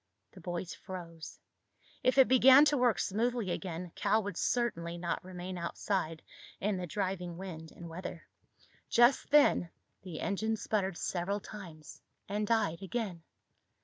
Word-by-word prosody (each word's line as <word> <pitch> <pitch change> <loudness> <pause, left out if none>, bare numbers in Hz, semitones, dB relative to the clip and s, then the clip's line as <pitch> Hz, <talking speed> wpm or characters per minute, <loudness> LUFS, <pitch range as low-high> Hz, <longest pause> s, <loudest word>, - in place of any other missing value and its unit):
The 185 - -14
boys 175 0 -4
froze. 170 -4 -9 0.6
If 255 +2 +2
it 265 - +8
began 260 +3 +8
to 295 0 +3
work 245 -4 +3
smoothly 225 -1 0
again, 175 -2 -4
Cal 215 +2 +2
would 200 -3 -4
certainly 175 -8 -1
not 170 0 -2
remain 180 0 -6
outside 170 -1 -2 0.4
in 205 0 0
the 180 -1 -4
driving 180 -1 -3
wind 165 -4 -7
and 170 - -10
weather. 170 0 -7 0.6
Just 240 +3 +4
then 285 - +5 0.3
the 180 -5 -7
engine 220 +2 0
sputtered 195 -5 -1
several 190 +3 -1
times 175 -8 -11 0.3
and 210 +1 -1
died 200 -7 +1
again. 195 -3 -3
190 Hz, 140 wpm, -32 LUFS, 170-220 Hz, 0.6 s, it